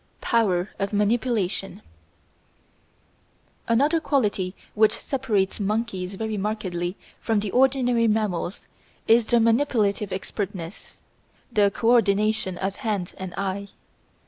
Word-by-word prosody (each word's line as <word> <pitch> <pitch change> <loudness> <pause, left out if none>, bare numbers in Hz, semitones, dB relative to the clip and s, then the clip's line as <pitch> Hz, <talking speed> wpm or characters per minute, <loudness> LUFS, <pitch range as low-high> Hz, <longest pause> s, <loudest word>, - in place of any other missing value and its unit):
Power 200 -5 +1
of 195 +1 -2
Manipulation 210 -2 0 1.8
Another 285 +8 +3
quality 205 -11 0 0.2
which 215 0 +3
separates 225 -9 -1
monkeys 200 -3 -2
very 220 +1 -3
markedly 190 -3 -3 0.2
from 225 -2 +1
ordinary 250 -3 +3
mammals 210 -4 -1 0.4
is 225 0 +5
their 240 - +4
manipulative 225 -4 +2
expertness, 190 -2 -5 0.5
the 205 -2 +4
co 225 +4 +1
ordination 215 -4 +2
of 195 +1 -3
hand 210 -8 -2
and 190 -1 -5
eye. 195 +1 -2
210 Hz, 100 wpm, -24 LUFS, 195-230 Hz, 1.8 s, is